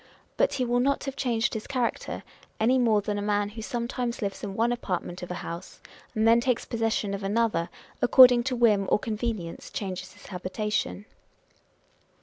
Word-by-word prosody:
But - - +2
he 255 - 0
will 245 0 +1
not 275 +3 +1
have 275 -1 -4
changed 240 -4 0
his 220 -2 -5
character, 250 -3 -2 0.4
any 250 +4 +3
more 220 -4 +3
than 205 0 -2
a - - -3
man 205 0 0
who 220 +2 -8
sometimes 240 +1 -3
lives 195 -1 -4
in 195 -2 -4
one 230 +3 +2
apartment 185 -6 -3
of 180 - -6
a 180 - -3
house 170 +2 -7 0.4
and 220 +1 +3
then 230 +1 +6
takes 250 -1 0
possession 225 -3 -1
of 200 - -4
another, 200 -4 0 0.3
according 245 -1 +7
to 260 -1 0
whim 215 -5 +3
or - - +6
convenience 215 -5 -4
changes 185 -2 -5
his 205 - -17
habitation. 205 +2 -3
220 Hz, 175 wpm, -27 LUFS, 200-240 Hz, 0.4 s, according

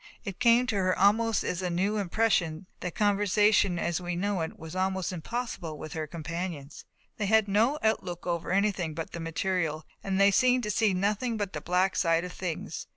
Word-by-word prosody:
It 195 -5 -6
came 240 0 +5
to 245 -4 -2
her 185 -1 +1
almost 220 +3 +3
as 180 - -2
a 180 - -1
new 190 +5 0
impression 190 -4 0
that 180 - -5
conversation 205 -2 +3
as 170 +1 -1
we 175 0 -3
know 195 0 -1
it 160 - -4
was 160 +2 -9
almost 190 0 -1
impossible 180 -3 -4
with 155 - -8
her 155 -1 -3
companions. 165 -2 -6 0.3
They 210 - -1
had 220 0 +4
no 225 +9 +2
outlook 185 -5 -1
over 170 -2 -2
anything 190 -5 0
but 165 0 -5
the 170 - -6
material 165 -1 -2 0.2
and 195 -1 -1
they 200 0 +6
seemed 250 +3 +3
to 210 - -1
see 210 -2 +2
nothing 210 +5 0
but 205 -2 -3
the - - -4
black 185 +2 +1
side 165 -1 +2
of 180 0 -6
things. 175 -4 -5
190 Hz, 195 wpm, -28 LUFS, 170-210 Hz, 0.3 s, they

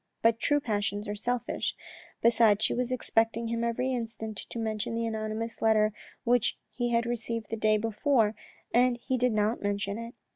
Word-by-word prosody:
But 230 0 +4
true 290 0 +3
passions 205 -4 -2
are 205 - -2
selfish. 245 +3 -2 0.5
Besides 225 -2 +5
she - - +1
was 250 0 -1
expecting 230 -2 +1
him 230 0 -1
every 250 +3 0
instant 225 -2 -4
to - - -6
mention 220 0 -2
the 230 0 0
anonymous 220 0 -3
letter 215 -1 +4 0.3
which 245 -1 +2
he 240 -1 -1
had 235 0 +2
received 230 -2 -3
the - - 0
day 215 -1 +3
before 225 +1 +2 0.4
and 245 0 +4
he 260 +2 -2
did 250 0 +2
not 215 +2 +1
mention 205 +1 -1
it. 230 +1 -7
230 Hz, 175 wpm, -29 LUFS, 215-240 Hz, 0.5 s, Besides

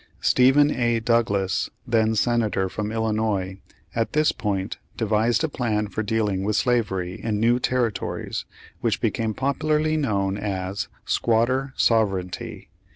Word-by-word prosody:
Stephen 135 +3 +5
A. 120 -3 +1
Douglas, 110 -5 +1 0.2
then 110 -2 +2
Senator 110 -4 +1
from 105 +2 -3
Illinois, 110 -4 -1 0.4
at 115 -1 -1
this 155 0 +3
point 100 -1 -3 0.2
devised 110 +3 +1
a - - +2
plan 110 -7 -1
for 110 - -3
dealing 105 -3 0
with 105 +1 0
slavery 95 -8 0
in 110 -2 -1
new 120 +3 +3
territories 110 -9 -2 0.3
which - - 0
became 110 -2 -1
popularly 155 +3 +1
known 100 -8 0
as 95 -1 -3 0.2
"squatter 130 +4 +1
sovereignty." 95 -6 0
110 Hz, 125 wpm, -24 LUFS, 100-120 Hz, 0.4 s, Stephen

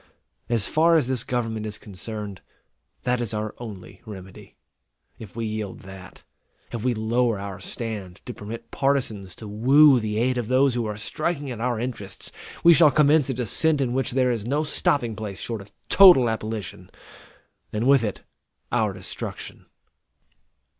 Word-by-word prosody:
As 115 -4 +1
far 165 +2 +3
as 155 -6 +3
this 130 -3 -2
government 115 -3 -2
is 105 0 -5
concerned, 105 0 -7 0.6
that 125 0 0
is 110 -2 -2
our 105 0 -3
only 105 -6 -9
remedy. 95 -4 -11 0.6
If 105 -3 -11
we 115 -1 -3
yield 110 -3 -4
that, 95 -1 -12 0.5
if 115 -2 -4
we 125 -1 +1
lower 115 +1 +1
our 100 -1 -6
stand 100 -3 -6
to 125 - -6
permit 115 +3 -8
partisans 120 -9 -1
to 110 - -9
woo 130 +6 +6
the 105 -1 -2
aid 125 +2 +1
of 115 - -3
those 130 +1 +3
who 120 -2 -1
are 105 -1 -4
striking 145 +4 -2
at 115 -2 -6
our 120 -2 0
interests, 110 -6 -6 0.3
we 170 - +9
shall 160 -1 +6
commence 150 0 +4
a 130 - -1
descent 145 - +1
in 125 -3 0
which 130 -2 -1
there 130 -1 +2
is 115 -4 -2
no 145 +4 +1
stopping 140 -6 0
place 105 -2 -6
short 115 -3 -4
of 100 - -15 0.2
total 175 -12 +7
abolition, 110 -5 -5 0.8
and 110 +2 -1
with 135 -2 +5
it 105 -3 -3 0.5
our - - +1
destruction. - - -7
115 Hz, 165 wpm, -24 LUFS, 105-130 Hz, 0.8 s, we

